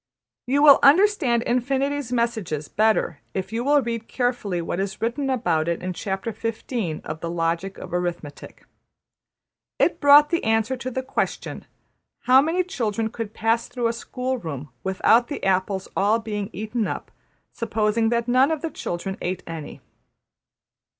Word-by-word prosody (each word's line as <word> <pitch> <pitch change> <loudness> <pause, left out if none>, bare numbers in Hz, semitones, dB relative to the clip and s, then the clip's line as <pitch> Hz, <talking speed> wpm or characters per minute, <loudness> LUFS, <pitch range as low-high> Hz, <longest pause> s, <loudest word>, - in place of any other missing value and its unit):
'' - - -68
You 280 +3 +2
will 285 -2 +9
understand 280 - +4
Infinity's 270 +2 -1
messages 220 -11 -1
better 215 -7 +1 0.2
if 190 +2 -3
you 230 +1 -1
will 285 +1 +3
read 230 -1 -4
carefully 245 -8 -1
what 170 +1 -3
is 195 0 -3
written 270 +5 -1
about 175 -11 0
it 170 0 -2
in 185 0 -2
Chapter 195 +4 -3
XV. 220 -5 -4
of 155 +1 -5
``The 170 +1 -4
Logic 170 +3 -2
of - - -9
Arithmetic.'' 175 -5 -5 1.1
It - - +2
brought 290 +1 +7
the 340 - 0
answer 225 +3 +1
to 255 0 -5
the 260 +1 -3
question: 265 - -3 0.6
``How 260 +2 +6
many 340 +4 +1
children 225 - -2
could 225 -3 -6
pass 225 +1 +1
through 240 -2 -1
a - - -1
school 255 +2 -3
room 145 - -6
without 220 +5 +3
the 285 - -6
apples 190 0 0
all 205 +3 +3
being 210 -3 -4
eaten 215 +3 -2
up, - - -5 0.4
supposing 225 0 0
that 235 0 0
none 255 +3 +4
of 320 0 -2
the 330 - -2
children 190 -4 -5
ate 180 0 -3
any?'' 165 -3 -8
225 Hz, 160 wpm, -23 LUFS, 190-255 Hz, 1.1 s, will